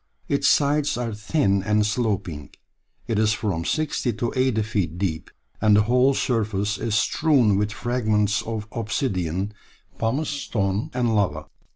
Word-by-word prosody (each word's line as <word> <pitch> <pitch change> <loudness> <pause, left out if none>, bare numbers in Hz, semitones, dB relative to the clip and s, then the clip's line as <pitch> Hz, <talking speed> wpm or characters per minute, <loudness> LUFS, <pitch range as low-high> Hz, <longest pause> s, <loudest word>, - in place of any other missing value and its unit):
Its 140 - +1
sides 145 -2 +2
are 120 -2 -3
thin 105 -2 +1
and 105 +2 +2
sloping, 100 - -2 0.6
it 115 -3 0
is 110 0 +3
from 100 -7 -2
sixty 150 - -1
to 115 +2 -3
eighty 130 -4 +2
feet 100 -7 -2
deep, 85 -4 -2 0.3
and 105 -1 +5
the 105 - +5
whole 125 +4 +3
surface 105 -5 -1
is 115 -2 -1
strewn 120 0 +3
with 105 +2 0
fragments 110 -3 0
of 110 -2 -5
obsidian, 100 - -2 0.5
pumice 130 +7 0
stones, 105 -8 -2
and 120 -3 +1
lava. 80 -7 0
110 Hz, 145 wpm, -24 LUFS, 100-120 Hz, 0.6 s, and